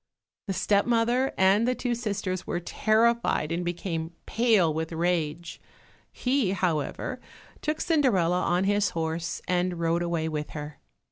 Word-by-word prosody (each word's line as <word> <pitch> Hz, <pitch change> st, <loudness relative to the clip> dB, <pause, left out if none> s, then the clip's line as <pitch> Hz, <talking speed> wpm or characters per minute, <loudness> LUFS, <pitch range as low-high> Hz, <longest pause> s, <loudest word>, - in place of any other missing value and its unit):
The 195 Hz, -, -1 dB
step 200 Hz, +3 st, +2 dB
mother 240 Hz, +3 st, +2 dB
and 195 Hz, +5 st, +4 dB
the 255 Hz, -, +1 dB
two 245 Hz, -1 st, -1 dB
sisters 205 Hz, -5 st, -3 dB
were 175 Hz, -, -1 dB
terrified 220 Hz, -2 st, +1 dB
and 170 Hz, +1 st, -1 dB
became 170 Hz, -1 st, -3 dB
pale 220 Hz, -9 st, +3 dB
with 160 Hz, +1 st, -3 dB
rage; 170 Hz, -1 st, -2 dB, 0.5 s
he, 250 Hz, -6 st, 0 dB
however, 175 Hz, -6 st, -2 dB, 0.4 s
took 305 Hz, 0 st, -1 dB
Cinderella 195 Hz, -, +2 dB
on 180 Hz, +1 st, +1 dB
his 205 Hz, 0 st, +2 dB
horse 165 Hz, +1 st, -3 dB
and 180 Hz, -1 st, 0 dB
rode 170 Hz, +1 st, +1 dB
away 170 Hz, -2 st, -1 dB
with 150 Hz, -1 st, -3 dB
her. 150 Hz, 0 st, -7 dB
180 Hz, 140 wpm, -27 LUFS, 165-225 Hz, 0.5 s, and